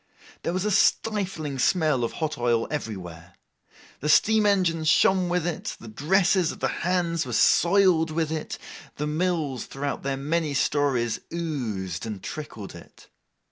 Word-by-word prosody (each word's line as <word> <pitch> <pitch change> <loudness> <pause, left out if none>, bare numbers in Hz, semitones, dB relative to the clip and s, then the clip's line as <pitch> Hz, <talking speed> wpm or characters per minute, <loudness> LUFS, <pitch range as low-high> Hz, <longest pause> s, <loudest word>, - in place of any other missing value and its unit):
There - - -2
was 185 +3 -2
a 210 - +1
stifling 190 -10 +1
smell 155 -4 +2
of 115 - -2
hot 155 -1 -2
oil 120 -2 +1
everywhere. 90 - -6 0.6
The 150 - -2
steam 215 +6 +4
engines 170 -5 +1
shone 185 +3 +4
with 175 -1 0
it, 175 -2 -4
the 115 - -11
dresses 175 - +2
of - - -10
the - - 0
Hands 170 -2 0
were 125 - -6
soiled 175 - +4
with 160 0 -1
it, 155 -1 -4 0.4
the 150 - -3
mills 155 -4 -1
throughout 140 +1 -4
their 135 -1 -2
many 150 +1 -1
stories 135 -5 +1
oozed 115 - -3
and 105 -4 -6
trickled 110 -10 -7
it. - - -15
155 Hz, 150 wpm, -25 LUFS, 130-175 Hz, 0.6 s, steam